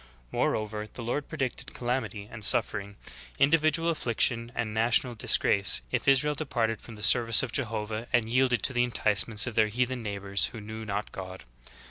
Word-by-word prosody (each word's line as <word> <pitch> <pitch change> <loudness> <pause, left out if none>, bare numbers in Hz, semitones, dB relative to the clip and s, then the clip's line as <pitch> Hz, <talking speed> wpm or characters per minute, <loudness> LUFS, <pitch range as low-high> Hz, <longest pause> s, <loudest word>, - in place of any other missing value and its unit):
Moreover 105 0 -1
the 120 - -8
Lord 130 +5 -3
predicted 135 -3 -3
calamity 120 -4 -3
and 115 -2 -9
suffering, 100 -3 +1 0.4
in 140 +1 +4
dividual 165 +1 +2
affliction 120 -4 0
and 110 -2 -2
national 115 +3 +2
disgrace, 100 -2 +3
if - - -2
Israel 140 +2 +3
departed 120 -7 -2
from 115 - -11
the 105 - -9
service 115 0 +5
of 130 - -4
Jehovah 110 -3 -3
and 120 -2 +2
yielded 125 +1 +1
to 135 - 0
the 120 0 +2
enticements 105 -2 +2
of 120 - -4
their 110 0 +3
heathen 125 +3 -1
neighbors 100 -2 -1
who 115 - -9
knew 110 +1 -8
not 100 0 -4
God. 95 -1 -8
115 Hz, 170 wpm, -28 LUFS, 105-125 Hz, 0.4 s, service